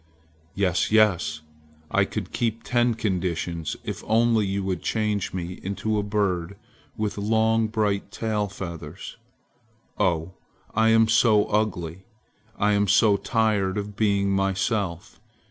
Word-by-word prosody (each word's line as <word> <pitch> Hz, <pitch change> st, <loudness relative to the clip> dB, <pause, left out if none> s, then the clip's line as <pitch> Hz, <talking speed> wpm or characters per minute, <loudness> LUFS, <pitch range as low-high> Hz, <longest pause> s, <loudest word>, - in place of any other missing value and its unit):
"Yes! 95 Hz, -2 st, +1 dB
yes! 95 Hz, -8 st, +3 dB, 0.5 s
I -, -, +3 dB
could -, -, -5 dB
keep 115 Hz, -1 st, -1 dB
ten 120 Hz, -1 st, +1 dB
conditions 85 Hz, -5 st, -2 dB
if -, -, -5 dB
only 115 Hz, -1 st, +3 dB
you 100 Hz, 0 st, -2 dB
would 95 Hz, -4 st, -2 dB
change 105 Hz, -3 st, -1 dB
me 90 Hz, 0 st, -5 dB
into 105 Hz, +2 st, -2 dB
a -, -, +1 dB
bird 100 Hz, -3 st, -1 dB, 0.4 s
with 105 Hz, -2 st, -2 dB
long, 110 Hz, +1 st, +2 dB
bright 105 Hz, -2 st, -1 dB
tail 105 Hz, -2 st, -2 dB
feathers. 85 Hz, -4 st, -8 dB, 0.8 s
Oh, 90 Hz, -3 st, 0 dB, 0.4 s
I 110 Hz, +1 st, +3 dB
am 115 Hz, 0 st, +5 dB
so 110 Hz, -2 st, +4 dB
ugly! 95 Hz, -4 st, -2 dB, 0.5 s
I 105 Hz, +1 st, +2 dB
am 100 Hz, 0 st, +2 dB
so 100 Hz, +2 st, +5 dB
tired 100 Hz, -2 st, 0 dB
of 105 Hz, 0 st, -4 dB
being 100 Hz, -2 st, +1 dB
myself! 95 Hz, -1 st, -1 dB
100 Hz, 130 wpm, -25 LUFS, 95-110 Hz, 0.8 s, am